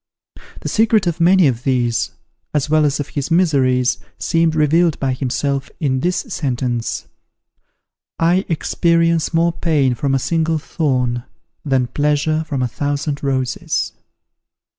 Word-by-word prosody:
The - - -5
secret 220 -2 +2
of 170 -1 -1
many 180 +1 +5
of 125 -4 +1
these, 120 -3 +1 0.5
as 150 0 0
well 155 -1 +4
as 145 0 0
of 145 - -4
his 140 0 -3
miseries, 135 -8 +2 0.2
seems 165 -1 +1
revealed 160 +1 +2
by 135 -1 0
himself 135 +1 -2
in 130 -3 0
this 180 +5 0
sentence: 125 - -2 1.1
"I 175 +3 +2
experience 165 0 +1
more 170 0 +2
pain 145 -7 +1
from 135 +3 0
a - - +3
single 160 +3 0
thorn, 125 -6 -1 0.4
than 135 -3 +1
pleasure 150 +4 0
from 135 -3 -1
a - - +1
thousand 145 +3 -3
roses." 130 -2 -1
145 Hz, 135 wpm, -19 LUFS, 130-165 Hz, 1.1 s, many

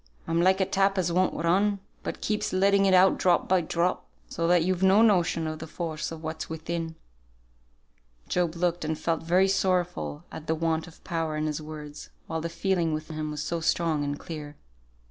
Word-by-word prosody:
I'm 165 +1 +1
like 190 +2 +4
a 190 - +3
tap 195 +1 +1
as 175 -2 +1
won't 185 +1 +2
run, 195 +5 +2 0.2
but - - -5
keeps 210 0 -1
letting 195 +1 +3
it 190 - +4
out 185 +1 +5
drop 180 -2 +3
by 185 -1 +3
drop, 170 +2 -1 0.2
so 165 - -2
that 175 -1 +4
you've 185 +1 0
no 190 +3 +6
notion 180 -6 +3
of 155 0 -4
the 160 - -7
force 160 -1 -4
of 165 0 -8
what's 160 0 -5
within." 165 0 -4 1.3
Job 175 -2 0
looked 175 0 0
and 155 0 -2
felt 165 0 -1
very 180 +4 +3
sorrowful 180 -5 0
at 160 - -9
the 160 - +1
want 160 0 -1
of 175 - -16
power 165 -2 -2
in 155 - -1
his 155 0 -2
words, 150 -1 -9 0.2
while 160 0 -3
the 170 - -3
feeling 170 -3 0
within 155 +1 -6
him 155 0 -3
was 150 0 -4
so 170 +3 -2
strong 160 -2 +1
and 145 0 -2
clear. 150 -3 -7
170 Hz, 200 wpm, -27 LUFS, 160-185 Hz, 1.3 s, no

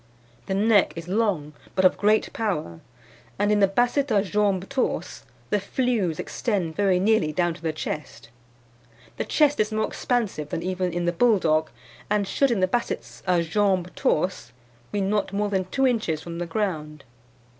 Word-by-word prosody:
"The 190 - -1
neck 205 0 +4
is 165 0 -7
long, 185 -7 0 0.2
but 190 0 +3
of 185 - +5
great 215 +2 +2
power; 155 - -2 0.6
and 205 +1 +2
in 210 - +3
the 195 - +5
Basset 245 +7 +1
a 205 -4 +3
jambes 200 -2 0
torses 270 -2 -2 0.3
the 210 - +3
flews 200 -5 -1
extend 190 -9 -2
very 195 -3 +2
nearly 200 -5 +2
down 175 +2 0
to 165 - -14
the 165 -1 -1
chest. 150 -6 -6 0.9
The - - -2
chest 295 -2 +2
is 215 +1 +1
more 215 0 +1
expansive 210 - -2
than 165 - -3
even 185 0 -1
in 175 +1 -2
the 175 - +1
Bulldog, 165 -7 +3 0.4
and 205 -1 +1
should 275 +7 +2
in 225 -6 0
the 185 - +4
Bassets 240 +5 -3
a 175 -2 +3
jambes 185 0 +1
torses 155 -6 -1 0.4
be 205 - -1
not 200 0 0
more 205 +1 0
than 190 -2 0
two 270 +8 0
inches 215 -11 +1
from 170 0 -6
the 175 - -3
ground. 155 -6 -3
195 Hz, 175 wpm, -25 LUFS, 170-215 Hz, 0.9 s, of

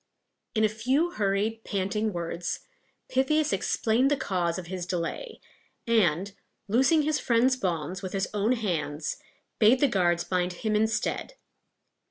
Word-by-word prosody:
In 220 - +2
a - - +6
few 260 +11 0
hurried, 210 - -1
panting 210 +2 -1
words, 170 -1 -3 0.5
Pythias 285 +1 +1
explained 225 +6 +2
the 290 - +2
cause 175 -7 -1
of 185 - -6
his 180 0 -5
delay, 180 - -4 0.5
and, 200 -5 +2 0.3
loosing 265 +9 +4
his 305 0 +1
friend's 245 +2 +3
bonds 180 -4 -2
with 185 -2 -6
his 195 -1 0
own 210 +4 +2
hands, 165 -9 -2 0.4
bade 230 +4 +6
the 285 - +4
guards 175 -6 +2
bind 180 -1 -1
him 215 +4 -2
instead. 220 - 0
210 Hz, 140 wpm, -27 LUFS, 180-245 Hz, 0.5 s, a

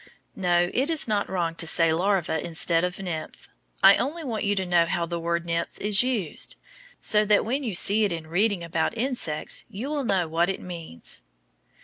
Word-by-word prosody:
No, 175 -1 +1
it 270 +5 +1
is 320 -5 -1
not 210 -2 0
wrong 175 -3 -1
to 165 0 -4
say 165 0 +3
larva 175 -2 0
instead 165 0 +2
of 180 0 -2
nymph. 175 -5 -6 0.4
I 195 +1 +8
only 315 +6 -3
want 230 -6 -3
you 205 0 +1
to 190 -1 -1
know 175 -1 +3
how 170 0 -1
the 170 0 -4
word 170 0 -1
nymph 170 0 -3
is 205 0 +4
used, 235 - -2 0.4
so 210 -1 +3
that 205 -1 +3
when 260 +6 -1
you 220 -7 -3
see 205 +4 +3
it 205 - +1
in 165 -2 -4
reading 190 +3 +1
about 170 +6 -1
insects 235 - -1
you 230 +6 -5
will 295 -2 -2
know 190 -7 +1
what 165 +3 +1
it 195 - -2
means. 165 - -6
180 Hz, 200 wpm, -25 LUFS, 170-215 Hz, 0.4 s, I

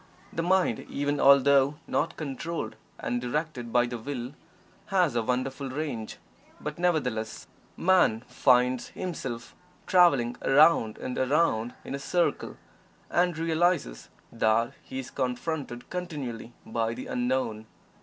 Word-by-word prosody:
The 165 - -1
mind, 180 -8 +2
even 145 +1 -1
although 140 +1 +5
not 165 +2 -1
controlled 160 +3 -4 0.2
and 120 0 -2
directed 125 -2 -3
by 120 0 +4
the 120 -1 -5
Will, 125 +1 -5 0.5
has 180 - +2
a 120 - +2
wonderful 130 +3 -2
range, 130 -5 -4 0.4
but, 150 +2 -6
nevertheless, 125 -11 -1 0.3
Man 180 -12 +3
finds 125 0 +2
himself 130 -10 -6 0.3
traveling 140 -10 +4
around 135 -6 +4
and 125 - -4
around 130 -4 +1
in - - -5
a 140 - -3
circle, 175 +5 -1 0.5
and 175 -2 +2
realizes 165 - 0 0.2
that 115 0 +2
he 130 - -8
is 130 - -6
confronted 130 0 -3
continually 140 -11 -5
by 115 0 -1
the - - -7
Unknown. 125 -3 -1
135 Hz, 125 wpm, -28 LUFS, 120-160 Hz, 0.5 s, although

